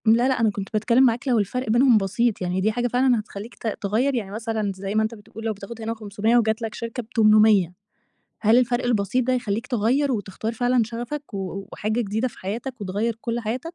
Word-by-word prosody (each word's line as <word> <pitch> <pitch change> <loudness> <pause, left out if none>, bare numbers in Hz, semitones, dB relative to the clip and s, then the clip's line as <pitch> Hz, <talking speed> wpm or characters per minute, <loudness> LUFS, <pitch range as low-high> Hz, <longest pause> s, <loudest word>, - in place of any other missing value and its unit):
لا، 230 +3 +5
لأ، 265 -2 +1
أنا 225 -2 +3
كنت 200 -1 -5
باتكلم 235 +4 +3
معاك 245 +3 +1
لو 245 -3 +3
الفرق 225 +4 -2
بينهم 240 +1 +5
بسيط، 210 +3 0
يعني 180 +1 -1
دي 215 +3 +2
حاجة 245 +2 -1
فعلًا 250 0 +2
هتخلّيك 210 +2 -8
ت - - -6
تغيَّر، 230 +7 +1
يعني 205 -5 -3
مثلًا 220 -1 -2
زي 195 +2 -5
ما 220 - +3
أنت 220 +1 -3
بتقول 210 +1 -11
لو 220 - 0
بتاخد 210 +3 -9
هنا 225 +1 -2
500 215 +1 0
وجات 220 0 +1
لك 225 -1 -4
شركة 230 +1 -5
ب800 215 -5 +4 0.7
هل 220 +2 +5
الفرق 245 0 +1
البسيط 235 +1 +1
ده 255 - +2
يخلّيك 230 -2 -1
تغيَّر 255 +4 +1
وتختار 215 +1 -3
فعلًا 245 +1 +2
شغفك 240 +4 -6
و 195 0 -5
وحاجة 215 +3 -1
جديدة 220 +3 -1
في - - -17
حياتك 235 +6 -5
وتغيَّر 205 +4 -2
كل 235 0 -2
حياتك؟ 245 +10 -4
225 Hz, 210 wpm, -23 LUFS, 210-245 Hz, 0.7 s, لا